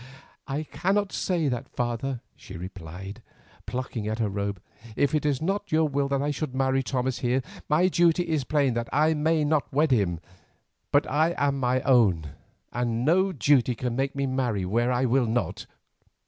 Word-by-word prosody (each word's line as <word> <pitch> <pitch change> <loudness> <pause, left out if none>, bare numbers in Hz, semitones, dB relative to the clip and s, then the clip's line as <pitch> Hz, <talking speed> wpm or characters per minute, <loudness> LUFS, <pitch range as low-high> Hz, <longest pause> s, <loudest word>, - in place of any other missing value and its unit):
"I 145 +2 -2
cannot 195 +5 0
say 170 -5 0
that, 125 -3 -3
father," 120 +1 -2
she 95 - -10
replied, 90 +2 -8 0.5
plucking 125 -4 -4
at 110 0 -2
her 110 -3 0
robe. 100 -1 -3 0.4
"If 140 - +1
it 150 -1 +1
is 145 0 0
not 200 +4 -2
your 155 0 +3
will 140 -1 0
that 140 0 0
I 145 - 0
should 145 -2 -4
marry 135 0 +2
Thomas 130 -1 -2
here, 125 +1 0 0.3
my 160 +5 +4
duty 175 -1 +3
is 155 -4 0
plain 140 -3 +1
and 115 - -5
I 155 +3 +3
may 155 +1 +1
not 150 -1 0
wed 150 +2 +2
him. 95 -9 +2 0.7
But - - +4
I 160 +5 +2
am 140 -1 +1
my 130 0 +1
own 95 - +3 0.4
and 120 0 -1
no 190 +5 +3
duty 130 -5 +3
can 120 0 -3
make 135 +2 -1
me 140 0 0
marry 125 -7 -1
where 120 +6 +1
I 125 +1 +1
will 125 0 +2
not. 120 +2 -2
130 Hz, 180 wpm, -26 LUFS, 120-150 Hz, 0.7 s, my